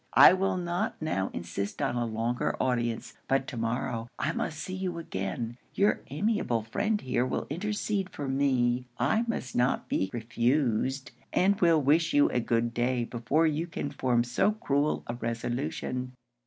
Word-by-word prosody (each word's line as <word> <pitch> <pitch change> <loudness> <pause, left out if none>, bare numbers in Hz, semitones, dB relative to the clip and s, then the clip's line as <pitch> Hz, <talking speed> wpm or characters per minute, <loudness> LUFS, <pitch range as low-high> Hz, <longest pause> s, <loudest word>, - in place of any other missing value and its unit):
I - - +10
will 190 0 +1
not 175 +4 -2
now 100 -12 -1
insist 100 +4 -4
on - - 0
a 120 -1 0
longer 115 +2 -1
audience; 120 -3 -1
but 135 0 +2
to - - -7
morrow 115 0 -2
I - - 0
must 160 - -3
see 185 - -5
you 185 -2 -3
again. 115 - -4 0.2
Your 205 +1 +3
amiable 150 - 0
friend 205 - 0
here 125 -5 0
will 130 - -2
intercede 205 +2 -1
for 145 -5 -5
me. 130 -2 +1
I 220 - +2
must 130 - -3
not 125 +2 +1
be 95 - 0
refused; 120 +2 0 0.2
and 200 +2 +2
will 165 -3 +5
wish 160 +4 +3
you 145 - +6
a 125 - +1
good 115 0 0
day 120 +1 +1
before 120 +7 +1
you 160 +2 0
can 145 -4 -4
form 125 -4 +1
so 120 - +2
cruel 150 -9 0
a 120 - -4
resolution.' 125 +2 -3
130 Hz, 165 wpm, -29 LUFS, 120-170 Hz, 0.2 s, I